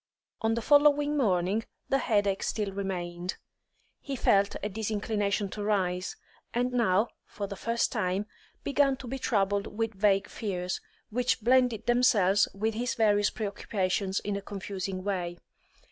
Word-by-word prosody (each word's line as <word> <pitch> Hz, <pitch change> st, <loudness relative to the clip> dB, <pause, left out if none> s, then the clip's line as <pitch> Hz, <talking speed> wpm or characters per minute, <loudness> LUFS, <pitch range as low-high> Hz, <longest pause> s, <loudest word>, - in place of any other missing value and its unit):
On 225 Hz, 0 st, +2 dB
the 230 Hz, -, -3 dB
following 290 Hz, +1 st, +5 dB
morning 200 Hz, -4 st, +1 dB, 0.3 s
the 270 Hz, -, +3 dB
headache 205 Hz, -5 st, +1 dB
still 210 Hz, -3 st, -1 dB
remained; 180 Hz, -2 st, -4 dB, 0.6 s
he 275 Hz, -, -5 dB
felt 200 Hz, -5 st, +3 dB
a -, -, +1 dB
disinclination 205 Hz, -1 st, -1 dB
to 205 Hz, +2 st, -5 dB
rise, 185 Hz, -3 st, 0 dB, 0.4 s
and 245 Hz, +1 st, +1 dB
now, 220 Hz, -2 st, +3 dB
for 205 Hz, -, -6 dB
the 200 Hz, 0 st, -6 dB
first 230 Hz, +4 st, 0 dB
time, 195 Hz, -3 st, 0 dB, 0.4 s
began 280 Hz, -1 st, +2 dB
to 255 Hz, -, -9 dB
be 265 Hz, +3 st, -4 dB
troubled 200 Hz, -3 st, +1 dB
with 225 Hz, 0 st, 0 dB
vague 195 Hz, 0 st, +2 dB
fears, 180 Hz, -4 st, -3 dB, 0.3 s
which 245 Hz, +1 st, +1 dB
blended 245 Hz, -1 st, +3 dB
themselves 220 Hz, -6 st, +4 dB
with 220 Hz, +3 st, -1 dB
his 245 Hz, +3 st, -2 dB
various 205 Hz, -2 st, +3 dB
pre 220 Hz, -, -4 dB
occupations 195 Hz, -1 st, -1 dB
in 205 Hz, -1 st, -2 dB
a 200 Hz, -, -3 dB
confusing 195 Hz, -1 st, -5 dB
way. 180 Hz, -3 st, -2 dB
205 Hz, 145 wpm, -29 LUFS, 195-235 Hz, 0.6 s, following